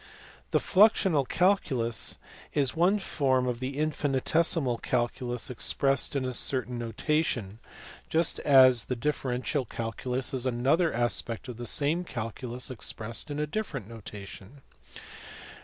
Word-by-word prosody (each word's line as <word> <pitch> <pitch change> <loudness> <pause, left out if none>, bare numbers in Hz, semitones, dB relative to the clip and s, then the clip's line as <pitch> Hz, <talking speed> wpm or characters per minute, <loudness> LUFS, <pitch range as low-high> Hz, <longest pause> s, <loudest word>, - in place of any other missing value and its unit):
The - - +2
fiuxional 190 - +3
calculus 135 - +1 0.4
is 140 -3 +2
one 180 +5 +3
form 135 -9 0
of 120 -1 -2
the 130 +2 -4
infinitesimal 150 -2 +1
calculus 120 0 -2
expressed 135 +3 +1
in 135 -2 0
a 130 - -3
certain 125 -1 +1
notation, 120 -3 -2 0.5
just 165 +1 +2
as 130 -4 +6
the 125 - -2
differential 135 +1 -1
calculus 125 +4 -2
is 130 -1 0
another 135 +8 +2
aspect 120 0 -1
of 120 - -7
the 120 0 -5
same 150 +8 +1
calculus 120 -2 -5
expressed 115 +1 -3
in 145 - -4
a 150 - 0
different 150 - -4
notation. 105 +2 -10
130 Hz, 125 wpm, -28 LUFS, 120-150 Hz, 0.5 s, as